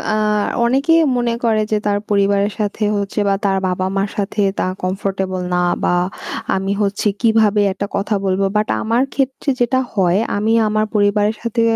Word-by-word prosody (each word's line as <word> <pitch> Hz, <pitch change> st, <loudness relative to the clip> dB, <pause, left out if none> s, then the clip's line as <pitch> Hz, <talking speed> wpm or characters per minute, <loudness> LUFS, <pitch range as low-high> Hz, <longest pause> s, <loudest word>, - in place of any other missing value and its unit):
আ -, -, +1 dB, 0.5 s
অনেকেই 275 Hz, +7 st, +3 dB, 0.2 s
মনে 240 Hz, -1 st, 0 dB
করে 220 Hz, -2 st, +2 dB
যে 215 Hz, -, +3 dB
তার 205 Hz, -1 st, +1 dB
পরিবারের 200 Hz, 0 st, +2 dB
সাথে 210 Hz, +1 st, -2 dB
হচ্ছে 200 Hz, +1 st, -3 dB
বা, 200 Hz, -, +3 dB
তার 195 Hz, -1 st, +2 dB
বাবা-মার 190 Hz, +2 st, -1 dB
সাথে 205 Hz, +1 st, -1 dB, 0.2 s
তারা 185 Hz, -, -1 dB
comfortable 190 Hz, 0 st, -2 dB
না 180 Hz, -, +2 dB, 0.2 s
বা 175 Hz, -, +2 dB, 0.6 s
আমি 195 Hz, +1 st, -2 dB
হচ্ছে 205 Hz, +1 st, 0 dB
কিভাবে 220 Hz, -2 st, +3 dB
একটা 200 Hz, -, -3 dB
কথা 205 Hz, +1 st, -1 dB
বলবো। 190 Hz, +1 st, +1 dB
বাট 215 Hz, -, +1 dB
আমার 230 Hz, +4 st, +1 dB
ক্ষেত্রে 270 Hz, +1 st, -1 dB
যেটা 245 Hz, +2 st, +2 dB
হয় 185 Hz, -2 st, +2 dB, 0.2 s
আমি 220 Hz, +2 st, +1 dB
আমার 215 Hz, 0 st, +1 dB
পরিবারের 205 Hz, +1 st, +2 dB
সাথে 235 Hz, 0 st, -1 dB
205 Hz, 165 wpm, -18 LUFS, 195-220 Hz, 0.6 s, অনেকেই